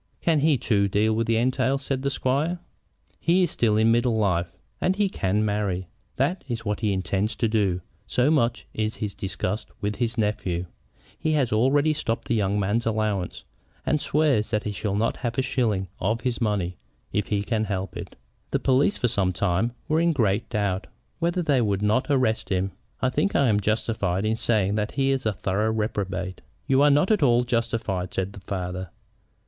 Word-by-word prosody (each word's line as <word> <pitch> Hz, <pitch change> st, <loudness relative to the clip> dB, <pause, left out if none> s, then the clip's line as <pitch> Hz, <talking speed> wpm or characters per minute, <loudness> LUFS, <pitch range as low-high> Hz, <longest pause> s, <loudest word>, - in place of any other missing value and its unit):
"Can 165 Hz, -3 st, +2 dB
he 150 Hz, -1 st, +3 dB
too 100 Hz, -4 st, +2 dB
deal 105 Hz, +3 st, +2 dB
with 115 Hz, +1 st, -1 dB
entails?" 130 Hz, +4 st, +1 dB
said 130 Hz, -1 st, -1 dB
the 140 Hz, -, 0 dB
squire. 140 Hz, +6 st, 0 dB, 0.6 s
"He 180 Hz, +3 st, +3 dB
is 175 Hz, -, 0 dB
still 110 Hz, -3 st, +2 dB
in 110 Hz, +1 st, +4 dB
middle 120 Hz, 0 st, +2 dB
life, 90 Hz, -5 st, +1 dB, 0.3 s
and 185 Hz, -, +2 dB
he 205 Hz, -1 st, +2 dB
can 105 Hz, -, 0 dB
marry. 100 Hz, -4 st, -1 dB, 0.3 s
That 145 Hz, +8 st, 0 dB
is 120 Hz, -3 st, -4 dB
what 105 Hz, -1 st, -1 dB
he 110 Hz, -2 st, +1 dB
intended 95 Hz, +3 st, -1 dB
to 115 Hz, -, +2 dB
do, 100 Hz, -5 st, +1 dB, 0.3 s
so 125 Hz, +4 st, +2 dB
much 120 Hz, -7 st, +1 dB
is 110 Hz, 0 st, -1 dB
he 105 Hz, -, -3 dB
disgusted 100 Hz, +2 st, -4 dB
with 105 Hz, +1 st, -2 dB
his 120 Hz, -1 st, -1 dB
nephew. 95 Hz, -5 st, -1 dB, 0.5 s
He 155 Hz, -, 0 dB
has 135 Hz, -7 st, +1 dB
already 140 Hz, +7 st, +3 dB
stopped 115 Hz, -5 st, -3 dB
the -, -, +3 dB
young 105 Hz, -2 st, +1 dB
man's 105 Hz, +4 st, 0 dB
allowance, 105 Hz, -4 st, -1 dB, 0.4 s
and 150 Hz, -, +1 dB
swears 145 Hz, -8 st, +2 dB
that 105 Hz, -2 st, 0 dB
he 105 Hz, -, -2 dB
shall 100 Hz, 0 st, -2 dB
not 110 Hz, +3 st, 0 dB
have 120 Hz, -3 st, -3 dB
a 130 Hz, -, +2 dB
shilling 115 Hz, -7 st, 0 dB
of 110 Hz, +5 st, 0 dB
his 125 Hz, 0 st, -2 dB
money 100 Hz, -5 st, 0 dB, 0.4 s
if 105 Hz, 0 st, 0 dB
he 100 Hz, -1 st, 0 dB
can 110 Hz, 0 st, 0 dB
help 95 Hz, -2 st, -3 dB
it. -, -, -7 dB, 0.3 s
The -, -, +1 dB
police 135 Hz, +8 st, +2 dB
for 125 Hz, -, +1 dB
some 100 Hz, -5 st, +1 dB
time 95 Hz, +5 st, 0 dB, 0.2 s
were 155 Hz, 0 st, +2 dB
in 170 Hz, 0 st, +3 dB
great 105 Hz, -7 st, +1 dB
doubt 100 Hz, -4 st, -1 dB, 0.3 s
whether 175 Hz, +1 st, 0 dB
they 140 Hz, -5 st, +3 dB
would 100 Hz, -3 st, 0 dB
not 110 Hz, +5 st, +2 dB
arrest 130 Hz, -7 st, +1 dB
him. 95 Hz, 0 st, 0 dB, 0.3 s
I 130 Hz, -, +3 dB
think 150 Hz, +9 st, 0 dB
I 140 Hz, -3 st, +4 dB
am 105 Hz, -1 st, +3 dB
justified 105 Hz, -3 st, 0 dB
in 110 Hz, +1 st, +1 dB
saying 105 Hz, -4 st, +1 dB
that 105 Hz, 0 st, -1 dB
he 135 Hz, -1 st, +2 dB
is 130 Hz, -4 st, 0 dB
a 110 Hz, -, +1 dB
thorough 100 Hz, +3 st, 0 dB
reprobate." 100 Hz, -4 st, -2 dB, 0.2 s
"You 135 Hz, +1 st, +3 dB
are 145 Hz, -, +6 dB
not 150 Hz, +8 st, +3 dB
at 215 Hz, -, +3 dB
all 120 Hz, -3 st, +4 dB
justified," 115 Hz, -6 st, -2 dB
said 95 Hz, +1 st, -2 dB
the 100 Hz, -, -9 dB
father. 90 Hz, -1 st, -4 dB
110 Hz, 195 wpm, -25 LUFS, 100-130 Hz, 0.6 s, are